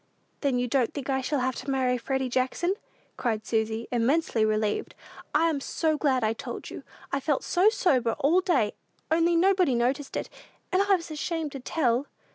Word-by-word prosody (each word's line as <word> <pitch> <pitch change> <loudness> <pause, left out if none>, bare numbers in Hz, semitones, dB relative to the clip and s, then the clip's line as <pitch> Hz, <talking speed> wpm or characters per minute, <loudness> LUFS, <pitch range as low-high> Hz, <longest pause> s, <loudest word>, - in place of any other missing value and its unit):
"Then 275 -4 +1
you 245 0 0
don't 245 -1 +1
think 280 -1 -3
I 265 0 +1
shall 275 +1 -1
have 260 0 0
to - - -6
marry 260 -2 +1
Freddy 265 +2 -1
Jackson," 260 +9 0 0.4
cried 220 -3 -1
Susy, 220 0 -1
immensely 245 0 +2
relieved. 215 -1 0 0.4
"I'm 320 -4 +2
so 315 +2 0
glad 270 -5 +1
I 220 +1 +2
told 225 - -7
you! - - -7 0.3
I 275 - +1
felt 280 0 0
so 370 +4 +4
sober 255 - +1
all 330 +7 +3
day, 340 - +1 0.4
only 335 +1 +3
nobody 365 -5 +3
noticed 265 +4 0
it, - - -3 0.4
and 370 - +3
I 400 0 +4
was 335 -3 -6
ashamed 310 0 -3
to 275 - -6
tell!" 255 -1 0
270 Hz, 180 wpm, -27 LUFS, 245-325 Hz, 0.4 s, so